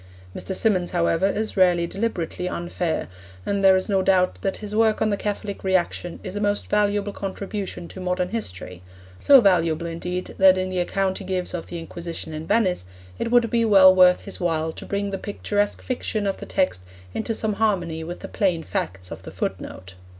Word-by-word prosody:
Mr. 190 - -4
Symonds, 185 -4 +1
however, 170 +1 +2
is 215 +2 -2
rarely 180 -3 +4
deliberately 180 -3 -3
unfair, 175 -1 -2 0.4
and 200 -1 -1
there 190 -1 +7
is 185 - 0
no 195 -3 +2
doubt 185 -1 +3
but - - -20
that 195 - -1
his 210 -1 -7
work 220 -1 +3
on 215 - +1
the - - +2
Catholic 205 0 -4
Reaction 180 -2 -1
is 185 0 -6
a 205 - -2
most 205 0 -1
valuable 205 -1 +1
contribution 195 -2 -5
to - - -10
modern 180 0 -1
history 95 - -5 0.4
so 275 -2 +7
valuable, 170 -5 +2
indeed, 180 +2 -4
that 190 -1 +7
in 185 0 -2
the 185 - -1
account 190 +1 0
he - - -7
gives 185 -1 -3
of 175 - -4
the 175 - -6
Inquisition 165 -1 -6
in 155 +1 -6
Venice 185 - +1 0.3
it - - -1
would 240 -1 +4
be 235 -1 +2
well 195 -4 +7
worth 180 -1 +6
his 200 - -8
while 160 -3 0
to - - -10
bring 200 0 -2
the 195 - -3
picturesque 205 0 -2
fiction 220 -4 -2
of 195 - -1
the - - -9
text 185 - 0 0.3
into 225 0 -2
some 220 -1 -1
harmony 175 -7 0
with 175 +2 -7
the - - -6
plain 180 -5 0
facts 90 -9 -4
of - - -7
the - - -9
footnote. 95 0 -5
190 Hz, 200 wpm, -23 LUFS, 175-205 Hz, 0.4 s, there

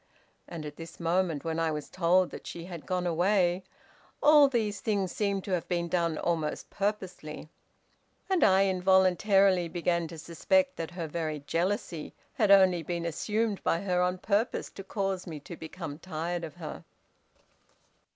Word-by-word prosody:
And 165 -3 -7
at 145 -1 -8
this 165 0 -10
moment, 170 -3 0
when 165 0 -2
I 165 -1 +1
was 150 -2 -4
told 185 +1 +2
that - - -9
she 170 0 -7
had 175 -4 -9
gone 180 -1 -1
away, 180 +1 +2 0.6
all 295 -1 +7
these 215 -6 -1
things 200 -4 0
seemed 200 -2 -1
to 195 - -6
have 175 -3 -1
been 170 -1 -1
done 170 -2 0
almost 160 -3 -2
purposely, 190 -7 -4 0.8
and 380 -2 +2
I 190 +1 +5
involuntarily 190 0 +4
began 170 0 0
to 165 - -9
suspect 275 - +1
that 165 - -4
her 175 -1 -5
very 155 -2 -3
jealousy 170 -1 -2 0.2
had 215 -4 +1
only 190 -3 +6
been 170 +1 -3
assumed 210 +5 -1
by 165 - +1
her 180 -2 +1
on 180 +1 +1
purpose 205 +5 -1
to 195 - -9
cause 195 -2 -2
me 155 -3 -6
to 170 - -9
become 160 -2 -7
tired 170 0 -4
of 160 -1 -7
her. 165 -3 -7
180 Hz, 160 wpm, -29 LUFS, 165-195 Hz, 0.8 s, all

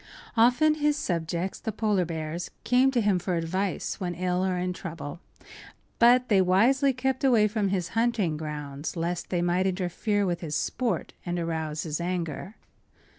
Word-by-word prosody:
Often 250 +7 +5
his 295 0 +2
subjects, 170 - -2
the 220 - -3
polar 210 -4 +1
bears, 165 +1 -4
came 255 +2 +4
to 250 -3 +1
him 205 -3 +2
for 180 +1 -2
advice 185 +3 -2
when 175 -2 -3
ill 180 +1 0
or 185 -1 0
in 180 0 -1
trouble; 165 -4 -7 0.8
but 245 +2 +6
they 200 -3 +4
wisely 235 +10 +4
kept 260 +1 -2
away 235 -6 +5
from 210 -1 0
his 185 -3 -1
hunting 225 -7 +1
grounds, 150 -1 -5
lest 170 +1 -2
they 175 -2 0
might 180 +2 +2
interfere 195 +3 0
with 175 -2 -1
his 155 -3 -3
sport 250 -3 -1
and 175 0 -3
arouse 160 -2 -2
his 155 0 -3
anger. 175 +2 -3
185 Hz, 165 wpm, -27 LUFS, 170-225 Hz, 0.8 s, but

